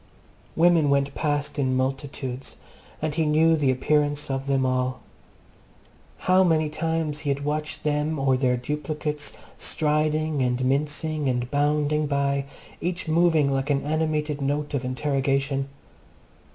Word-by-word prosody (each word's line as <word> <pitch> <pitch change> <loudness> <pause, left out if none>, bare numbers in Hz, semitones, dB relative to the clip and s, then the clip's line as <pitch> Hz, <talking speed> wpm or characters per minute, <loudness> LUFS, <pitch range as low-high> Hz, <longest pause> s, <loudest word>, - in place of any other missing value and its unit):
Women 165 -3 +4
went 140 0 +2
past 145 -1 -1
in 130 -2 +1
multitudes, 135 -1 -3 0.5
and 155 -1 0
he 160 - +1
knew 160 +2 +4
the 145 -4 +1
appearance 145 +2 +1
of 135 +1 -3
them 135 -1 +2
all. 130 0 0 1.3
How 185 +1 +5
many 160 -3 +2
times 160 -1 -2
he 150 - -3
had 140 +1 -1
watched 150 +1 -3
them 150 +1 0
or 135 -1 +2
their 125 -1 +1
duplicates 150 +2 -3 0.3
striding 155 -1 0
and 125 0 0
mincing 150 +2 0
and 125 -1 -1
bounding 150 +1 +1
by, 140 -1 0 0.4
each 175 0 -3
moving 160 -3 +3
like 135 +1 -1
an 140 -1 +1
animated 150 -1 -1
note 145 +2 -1
of 140 -2 -1
interrogation! 135 +1 0
145 Hz, 135 wpm, -25 LUFS, 135-155 Hz, 1.3 s, How